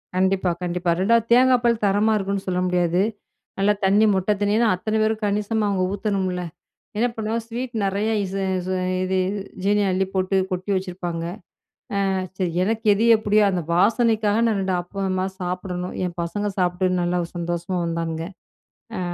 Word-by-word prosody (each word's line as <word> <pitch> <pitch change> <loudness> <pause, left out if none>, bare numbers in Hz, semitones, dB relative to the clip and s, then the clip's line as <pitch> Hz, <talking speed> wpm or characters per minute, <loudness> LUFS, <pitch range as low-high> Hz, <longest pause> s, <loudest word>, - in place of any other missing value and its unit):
கண்டிப்பா, 190 -1 +2
கண்டிப்பா. 175 0 -1
ரெண்டாவது 230 +4 +3
தேங்கா 255 +1 +6
பால் 235 -2 +2
தரமா 205 +2 +3
இருக்குன்னு 195 -1 -2
சொல்ல 180 -1 0
முடியாது. 175 0 +1 0.6
நல்லா 205 +1 +4
தண்ணி 205 +3 +4
மொத்த 190 +2 +1
தண்ணில, 205 +3 +2
அத்தன 215 +4 -2
பேரும் 220 0 0
கணிசமா 210 +1 0
அவங்க 190 -2 0
ஊத்தணும்ல. 195 -3 -1 0.6
என்ன 235 +3 +3
பண்ணுவோம் 220 +1 -2
ஸ்வீட் 240 +2 -5
நிறையா 200 +3 0
இது 195 0 -3 0.2
இது 185 +1 -2 0.3
இது 190 0 0 0.5
ஜீனிய 205 0 +2
அள்ளி 190 +1 +1
போட்டு 190 0 0 0.2
கொட்டி 185 +2 -3
வச்சுருப்பாங்க. 175 -3 -3 0.8
அ - - +1 0.3
சரி 185 -2 0
எனக்கு 225 +3 -1
எது 215 +3 +1
எப்படியோ, 210 0 +3
அந்த 180 -2 -1
வாசனைக்காக 220 +2 +3
நான் 215 -3 +1
2 190 -1 -1
ஆப்பமா 185 +1 -2 0.2
சாப்பிடணும். 180 0 -4
என் 175 -1 -5
பசங்க 205 +5 -2
சாப்பிட்டு 180 0 +1
நல்லா 175 +1 0 0.2
சந்தோஷமா 175 +2 -2
வந்தாங்க. 165 -1 -2 0.8
அ - - -2
195 Hz, 150 wpm, -23 LUFS, 180-215 Hz, 0.8 s, தேங்கா